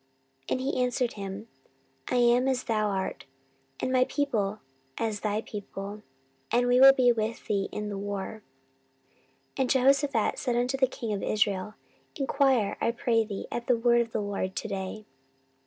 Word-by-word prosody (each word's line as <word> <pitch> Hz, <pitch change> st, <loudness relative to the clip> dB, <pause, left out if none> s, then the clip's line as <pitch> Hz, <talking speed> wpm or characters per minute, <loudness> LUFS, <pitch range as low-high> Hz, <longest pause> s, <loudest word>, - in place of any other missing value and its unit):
And -, -, 0 dB
he 260 Hz, 0 st, -1 dB
answered 250 Hz, -1 st, 0 dB
him, 200 Hz, +1 st, -6 dB, 0.6 s
I -, -, 0 dB
am 245 Hz, +1 st, +4 dB
as 260 Hz, -1 st, 0 dB
thou 215 Hz, -2 st, 0 dB
art, 190 Hz, -2 st, -3 dB, 0.5 s
and 255 Hz, -, -1 dB
my 255 Hz, 0 st, +4 dB
people 220 Hz, -9 st, -1 dB, 0.4 s
as 220 Hz, -2 st, -1 dB
thy 210 Hz, 0 st, -1 dB
people; 205 Hz, -1 st, -7 dB, 0.5 s
and 245 Hz, +1 st, +2 dB
we 245 Hz, 0 st, +4 dB
will 270 Hz, +1 st, +10 dB
be 255 Hz, -2 st, +4 dB
with 225 Hz, 0 st, -2 dB
thee 200 Hz, -2 st, -1 dB
in 210 Hz, 0 st, -4 dB
the 200 Hz, -1 st, -4 dB
war. 205 Hz, +2 st, -5 dB, 1.2 s
14:018:004 -, -, -8 dB
And 260 Hz, -2 st, +1 dB
Jehoshaphat 275 Hz, -2 st, +3 dB
said 245 Hz, -3 st, -1 dB
unto 245 Hz, +2 st, +1 dB
the 265 Hz, -1 st, +3 dB
king 230 Hz, -3 st, -4 dB
of 200 Hz, -, -3 dB
Israel, 205 Hz, -1 st, 0 dB, 0.4 s
Enquire, 270 Hz, -6 st, +2 dB
I -, -, +2 dB
pray 230 Hz, -1 st, +1 dB
thee, 205 Hz, -2 st, -6 dB
at 240 Hz, -, -4 dB
the 245 Hz, -, +3 dB
word 240 Hz, +1 st, +4 dB
of 230 Hz, -1 st, -4 dB
the 220 Hz, -, -1 dB
LORD 195 Hz, -2 st, -3 dB
to 220 Hz, -, -3 dB
day. 195 Hz, +1 st, -5 dB
225 Hz, 170 wpm, -28 LUFS, 205-250 Hz, 1.2 s, will